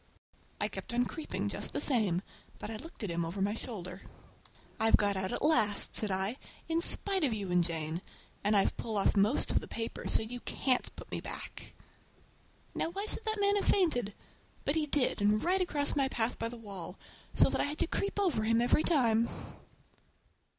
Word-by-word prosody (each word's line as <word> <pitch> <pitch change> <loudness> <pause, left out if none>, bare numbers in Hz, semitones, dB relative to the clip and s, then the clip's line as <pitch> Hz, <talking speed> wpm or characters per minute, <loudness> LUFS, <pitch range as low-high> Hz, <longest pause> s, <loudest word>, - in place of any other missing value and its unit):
I - - +1
kept 235 - -5
on 245 +1 +3
creeping 315 +5 -4
just - - -3
the - - -1
same, 205 - +2 0.3
but 210 - -6
I 220 - -4
looked 320 -2 -9
at 200 - -2
him 170 0 -1
over 170 +4 -4
my 200 +2 +1
shoulder. 190 -5 -6 0.8
"I've 225 0 +5
got 205 -1 +1
out 190 0 -1
at - - -1
last," 215 -10 +2
said 215 - 0
I, 195 +5 0 0.3
"in 330 0 +1
spite 385 +1 +4
of 265 -6 +2
you 200 -4 -4
and 175 -1 +4
Jane! 165 0 -2 0.4
And 205 +1 +3
I've 195 - +2
pulled 220 -2 -3
off 195 - +3
most 210 +6 +3
of - - +3
the - - -9
paper, 225 0 -5
so - - +2
you 245 +3 -6
can't 255 +1 0
put - - -11
me - - -3
back!" - - -8 1.0
Now - - -1
why 395 +4 -4
should 435 - -4
that 435 -1 -1
man 405 0 +3
have - - -1
fainted? 245 - +2 0.5
But 285 - +2
he 310 -1 0
did, 280 -6 +2
and 210 +1 +3
right 370 +2 +2
across 290 -5 +1
my 275 -2 +2
path 235 -2 -1
by 230 - -1
the 240 - -8
wall, 195 -5 -8 0.4
so - - +5
that - - +1
I - - +1
had 295 +1 -4
to - - +2
creep 400 +4 -2
over 325 - +1
him 230 +1 +3
every 245 +5 +3
time! 235 -9 +3
230 Hz, 205 wpm, -32 LUFS, 200-300 Hz, 1.0 s, I've